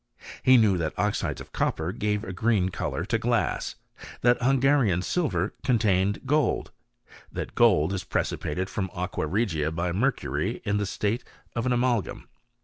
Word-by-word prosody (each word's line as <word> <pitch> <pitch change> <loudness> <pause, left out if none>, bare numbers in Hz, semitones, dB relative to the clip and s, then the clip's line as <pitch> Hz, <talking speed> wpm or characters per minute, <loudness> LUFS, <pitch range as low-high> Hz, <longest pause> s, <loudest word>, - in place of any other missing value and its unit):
He 130 0 +6
knew 105 -6 +4
that 80 -2 -3
oxides - - -1
of - - -12
copper 80 +2 -1
gave 105 0 -1
a 95 - -5
green 100 -1 +1
colour - - -3
to - - 0
glass; - - 0 0.5
that 120 +1 +3
Hungarian 130 -7 +3
silver 100 - 0
contained 105 -4 +1
gold; 150 +2 +1 0.6
that - - -5
gold 95 -8 +4
is 95 - -3
precipitated 90 +5 -2
from 95 0 -3
aqua 90 -3 -2
regia 85 -5 0
by 85 +2 -2
mercury, 120 +10 -1
in 105 0 +1
the 105 -1 -1
state 105 +5 -1 0.3
of 120 +1 -1
an - - +1
amalgam. 120 -5 0
105 Hz, 150 wpm, -26 LUFS, 90-120 Hz, 0.6 s, He